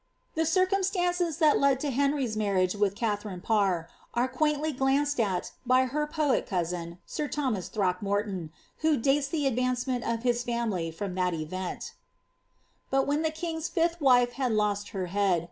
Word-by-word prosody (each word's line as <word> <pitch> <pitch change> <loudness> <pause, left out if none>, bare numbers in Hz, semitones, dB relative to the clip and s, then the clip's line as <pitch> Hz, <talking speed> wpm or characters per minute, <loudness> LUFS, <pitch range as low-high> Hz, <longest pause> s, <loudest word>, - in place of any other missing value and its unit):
The 320 0 0
circumstances 365 -2 +1
that 310 -3 +4
led 275 -2 +3
to 290 - -1
Henry's 275 -3 +1
marriage 195 -4 +1
with 205 -1 +1
Katharine 205 -4 -2
Parr, 195 -7 +1 0.3
are 240 +2 +2
quaintly 300 +3 0
glanced 275 +1 +1
at 195 -5 0
by 255 +1 +4
her 300 +4 -1
poet 300 -3 +1
cousin, 170 -2 -3
sir 300 - -3
Thomas 245 - -2
Throckmorton^ 195 -2 -1 0.3
who 310 -2 +3
dates 275 +4 +2
the 295 0 -1
advancement 250 -1 0
of 230 0 -2
his 240 -1 +2
family 230 -8 -1
from 185 +3 -5
that 180 -1 0
event: 180 +4 -5 0.5
— - - -42
But 270 0 +2
when 290 +2 +1
the 320 - +1
king's 320 0 -4
fifUi 335 0 0
wife 245 -3 +5
had 255 -3 0
lost 205 -1 0
her 190 -2 -3
head. 190 -1 +2
245 Hz, 160 wpm, -28 LUFS, 200-295 Hz, 0.5 s, wife